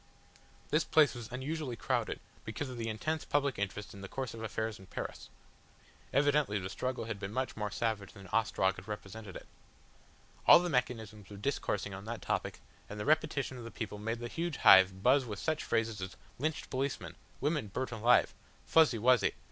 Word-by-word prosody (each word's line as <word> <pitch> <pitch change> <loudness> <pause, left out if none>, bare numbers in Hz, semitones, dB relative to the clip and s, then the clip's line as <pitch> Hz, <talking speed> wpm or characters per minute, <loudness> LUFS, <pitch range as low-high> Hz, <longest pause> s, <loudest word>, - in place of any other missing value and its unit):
This 155 +1 +3
place 155 -4 +4
was 120 -2 -8
unusually 135 0 -3
crowded, - - -1 0.2
because 130 +5 -4
of 125 - -7
the 115 -1 -2
intense 155 +9 -2
public 140 -5 0
interest 100 +1 -3
in 100 - -10
the 100 - -6
course 130 +2 -4
of 115 - -8
affairs 110 -1 -3
in 95 - -14
Paris. - - -6 0.8
Evidently 145 -5 +3
the 95 -1 -4
struggle 130 +3 -2
had 115 -3 -4
been 95 0 -5
much 130 +2 -2
more 105 -1 -2
savage 105 -3 -2
than 100 -2 -12
Ostrog 100 -3 +2
had 95 +2 -10
represented 105 -1 -7
it. - - -8 1.0
All - - +11
the 175 +1 0
mechanisms 110 -5 -2
were 100 - -9
discoursing 105 -4 -2
upon 95 +1 -7
that 115 +1 -5
topic, - - -2 0.3
and 105 - -6
the 105 - -3
repetition 145 -4 +1
of - - -8
the 115 - -6
people 105 -3 -5
made 115 +2 -2
the 120 0 -5
huge 165 +4 -3
hive 95 0 +7
buzz 135 +2 +5
with 105 -5 -5
such 155 -1 -1
phrases 115 -2 0
as 95 0 -6 0.2
"Lynched 155 +3 -2
policemen," 135 +1 -2 0.3
"Women 145 -4 0
burnt 130 +6 -3
alive," 115 +2 +4 0.3
"Fuzzy 160 -7 +5
Wuzzy." 125 +2 +4
115 Hz, 190 wpm, -33 LUFS, 105-135 Hz, 1.0 s, All